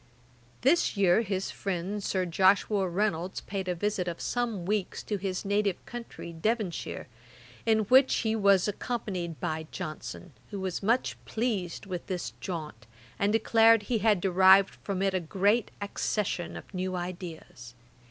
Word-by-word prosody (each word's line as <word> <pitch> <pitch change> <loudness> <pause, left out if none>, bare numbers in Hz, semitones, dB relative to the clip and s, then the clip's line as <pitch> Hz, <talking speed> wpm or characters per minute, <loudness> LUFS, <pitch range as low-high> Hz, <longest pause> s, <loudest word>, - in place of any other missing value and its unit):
This 275 -3 +3
year 195 +1 +4
his 195 -3 -2
friend 195 +2 -3
Sir 185 -1 0
Joshua 190 +2 +3
Reynolds 185 -1 -1
paid 195 -1 -4
a 180 - 0
visit 195 0 -1
of 170 -1 -4
some 230 -7 -2
weeks 205 0 -1
to 210 - -2
his 190 -1 -3
native 200 -1 0
country, 235 -8 -8
Devonshire, 205 +1 -2 0.6
in 220 -1 +4
which 260 +6 +5
he 220 0 +2
was 200 -3 +4
accompanied 195 -6 -3
by 160 0 -3
Johnson, 155 +2 -7 0.2
who 200 - -5
was 190 -2 -3
much 230 +5 0
pleased 215 -6 -2
with 180 -3 -5
this 185 -2 -3
jaunt, 155 - -6 0.3
and 200 +1 +2
declared 225 0 +5
he 230 +1 0
had 210 -2 +3
derived 190 +1 +6
from 195 -1 -2
it 195 -1 +1
a 185 - +1
great 200 +7 +1
accession 200 -3 -2
of - - -12
new 185 0 -2
ideas. 170 -9 -7
195 Hz, 150 wpm, -29 LUFS, 180-210 Hz, 0.6 s, derived